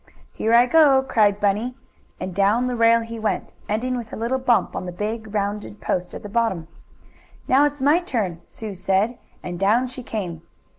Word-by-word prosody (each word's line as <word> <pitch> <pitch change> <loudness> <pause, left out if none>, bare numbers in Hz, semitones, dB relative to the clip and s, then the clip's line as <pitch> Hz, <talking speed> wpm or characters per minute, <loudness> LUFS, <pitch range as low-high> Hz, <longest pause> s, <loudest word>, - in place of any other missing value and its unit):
"Here 225 - -1
I 235 +1 +7
go!" 275 -1 +5
cried 210 -5 +2
Bunny, 210 +5 0 0.4
and 185 0 -5
down 200 +6 +2
the 250 -1 -1
rail 230 0 +4
he 230 0 -7
went, 215 -2 -2 0.2
ending 245 +5 -1
with 230 -3 -7
a - - -5
little 235 +4 -1
bump 250 -3 +2
on 185 - -4
the - - -4
big, 215 +4 -4
round 205 0 -1 0.2
post 180 0 -2
at - - -8
the - - -6
bottom. 205 -7 -1 0.8
"Now 275 +3 +5
it's 290 -1 -2
my 295 +5 +4
turn," 210 - -3
Sue 215 -2 -7
said, 195 +5 0 0.2
and 175 -1 -5
down 215 +6 +3
she 255 0 -8
came. 185 -9 -5
225 Hz, 190 wpm, -22 LUFS, 200-250 Hz, 0.8 s, I